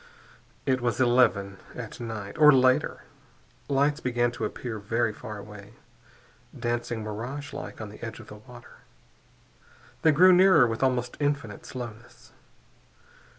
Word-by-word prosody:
It 130 Hz, -1 st, +1 dB
was 120 Hz, -3 st, -1 dB
eleven 120 Hz, -6 st, +2 dB, 0.2 s
at 115 Hz, -2 st, -8 dB
night, 110 Hz, -4 st, -6 dB
or 150 Hz, -1 st, +9 dB
later. 130 Hz, +2 st, +2 dB, 0.7 s
Lights 145 Hz, +2 st, +2 dB
began 120 Hz, -3 st, 0 dB
to 125 Hz, -, -4 dB
appear, 115 Hz, -3 st, -5 dB
very 115 Hz, +2 st, -1 dB
far 105 Hz, 0 st, -8 dB
away, 105 Hz, 0 st, -11 dB, 0.9 s
dancing 120 Hz, -1 st, -2 dB
miragelike 130 Hz, +7 st, -6 dB
on 110 Hz, -2 st, -6 dB
the 105 Hz, -, -13 dB
edge 115 Hz, -1 st, -6 dB
of -, -, -11 dB
the 105 Hz, -, -11 dB
water. 120 Hz, +2 st, -15 dB, 1.2 s
They 160 Hz, -, +5 dB
grew 180 Hz, +5 st, +6 dB
nearer 180 Hz, -7 st, +6 dB
with 115 Hz, -1 st, -3 dB
almost 125 Hz, -2 st, 0 dB
infinite 145 Hz, -8 st, -2 dB
slowness. 120 Hz, -2 st, -9 dB
120 Hz, 130 wpm, -27 LUFS, 110-135 Hz, 1.2 s, or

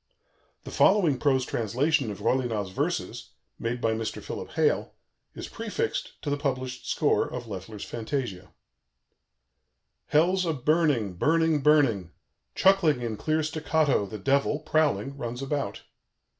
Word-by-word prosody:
The -, -, -8 dB
following 165 Hz, -11 st, +4 dB
prose 130 Hz, -2 st, +2 dB
translation 130 Hz, +5 st, 0 dB
of 100 Hz, -1 st, -7 dB
Rollinat's 110 Hz, -5 st, 0 dB
verses, -, -, -3 dB, 0.3 s
made 115 Hz, +2 st, -2 dB
by 115 Hz, -1 st, +1 dB
Mr. 110 Hz, -1 st, -3 dB
Philip -, -, -6 dB
Hale, -, -, +1 dB, 0.4 s
is -, -, -6 dB
prefixed -, -, -3 dB
to 145 Hz, -, -2 dB
the 145 Hz, -, +1 dB
published 130 Hz, -3 st, -3 dB
score -, -, +1 dB
of 125 Hz, -1 st, -5 dB
Loeffler's 100 Hz, 0 st, -7 dB
fantasia: 115 Hz, -5 st, -4 dB, 1.6 s
"Hell's 180 Hz, +5 st, +3 dB
a 165 Hz, -2 st, 0 dB
burning, 145 Hz, -, +1 dB
burning, 160 Hz, -, +2 dB
burning. 135 Hz, -, +3 dB, 0.5 s
Chuckling 170 Hz, -10 st, +3 dB
in 115 Hz, -2 st, -2 dB
clear 155 Hz, +7 st, 0 dB
staccato, 155 Hz, -7 st, +1 dB
the 110 Hz, -, -7 dB
Devil, 140 Hz, +7 st, +1 dB
prowling, 150 Hz, -3 st, +1 dB
runs 120 Hz, +1 st, -4 dB
about. 140 Hz, +1 st, -3 dB
135 Hz, 130 wpm, -27 LUFS, 115-155 Hz, 1.6 s, following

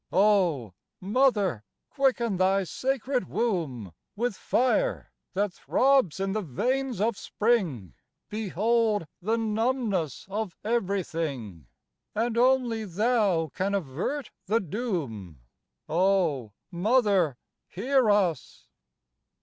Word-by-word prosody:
"Oh! 180 Hz, -, +3 dB, 0.3 s
Mother, 205 Hz, -, +2 dB, 0.3 s
quicken 245 Hz, -7 st, +1 dB
thy 190 Hz, +1 st, +3 dB
sacred 255 Hz, -, -2 dB
womb, 150 Hz, -, -2 dB, 0.2 s
With 235 Hz, 0 st, -1 dB
fire 260 Hz, -, 0 dB, 0.2 s
that 200 Hz, -1 st, 0 dB
throbs 260 Hz, -, +2 dB
in 195 Hz, 0 st, -1 dB
the 215 Hz, +2 st, -1 dB
veins 250 Hz, -, -1 dB
of 220 Hz, +2 st, +1 dB
Spring, 180 Hz, -, 0 dB, 0.3 s
Behold 215 Hz, 0 st, +1 dB, 0.2 s
the 220 Hz, +5 st, 0 dB
numbness 220 Hz, -, -1 dB
of 200 Hz, -2 st, -4 dB
everything, 165 Hz, -, -2 dB, 0.5 s
And 230 Hz, +2 st, 0 dB
only 245 Hz, -2 st, +2 dB
thou 200 Hz, -, +1 dB
can 195 Hz, +2 st, -1 dB
avert 195 Hz, -, -3 dB, 0.2 s
the 220 Hz, +4 st, +3 dB
doom." 150 Hz, -, -4 dB, 0.5 s
"Oh! 165 Hz, -, +1 dB, 0.2 s
Mother, 195 Hz, -, +2 dB, 0.3 s
hear 250 Hz, +4 st, +1 dB
us!" 185 Hz, -9 st, 0 dB
200 Hz, 95 wpm, -27 LUFS, 170-235 Hz, 0.5 s, Oh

